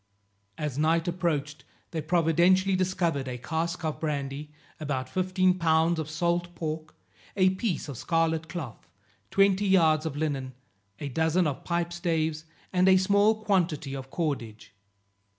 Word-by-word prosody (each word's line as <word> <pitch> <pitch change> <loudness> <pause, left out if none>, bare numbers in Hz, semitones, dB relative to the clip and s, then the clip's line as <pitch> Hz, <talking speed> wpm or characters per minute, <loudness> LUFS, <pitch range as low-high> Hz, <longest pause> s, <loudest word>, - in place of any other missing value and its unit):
As 150 -2 -3
night 165 +2 +2
approached, 155 -4 -2 0.3
they 160 - -2
providentially 175 +4 +3
discovered 175 -7 0
a 125 -1 -4
cask 165 +6 -3
of 155 - -2
brandy, 145 -1 -3 0.3
about 135 -4 -3
fifteen 185 +4 +1
pounds 165 0 +3
of 155 -1 -4
salt 175 +2 -1
pork, 155 -1 -5 0.4
a 185 -1 +5
piece 190 -4 -2
of 140 -5 -7
scarlet 165 -1 0
cloth, 140 - -7 0.4
twenty 195 - +3
yards 160 -4 +4
of 145 -2 -5
linen, 135 -4 -2 0.4
a 145 - -4
dozen 160 +5 +1
of 145 -3 -2
pipe 170 0 -1
staves, 160 -2 -1 0.3
and 185 +1 +4
a 190 - +7
small 205 +3 +3
quantity 165 -9 0
of 135 -1 -7
cordage. 120 - -4
165 Hz, 140 wpm, -27 LUFS, 150-180 Hz, 0.4 s, a